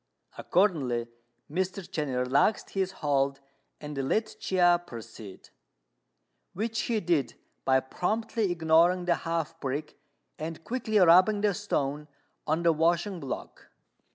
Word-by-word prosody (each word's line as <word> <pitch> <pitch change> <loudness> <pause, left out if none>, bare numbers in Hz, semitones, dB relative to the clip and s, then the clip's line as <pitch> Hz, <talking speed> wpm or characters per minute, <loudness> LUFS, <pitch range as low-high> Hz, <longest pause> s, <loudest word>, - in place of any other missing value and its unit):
Accordingly, 135 - +1 0.4
Mr. 185 +3 -3
Chên 150 -2 -3
relaxed 135 +11 +1
his 190 -1 -1
hold 140 -1 +1 0.4
and 150 0 -7
let 220 0 0
Chia 175 -2 +3
proceed; 115 - -11 1.0
which 225 +4 -2
he 225 -2 +2
did 160 - 0 0.3
by 130 0 +4
promptly 215 - -1
ignoring 170 +2 +3
the 175 - +3
half 165 -1 -3
brick 145 +2 -4 0.4
and 160 +1 -6
quickly 225 -1 -1
rubbing 185 +3 +6
the 205 -1 +2
stone 150 -7 -2 0.4
on 160 +2 0
the 170 -1 +4
washing 170 +4 +1
block. 135 -5 -7
170 Hz, 120 wpm, -28 LUFS, 145-190 Hz, 1.0 s, rubbing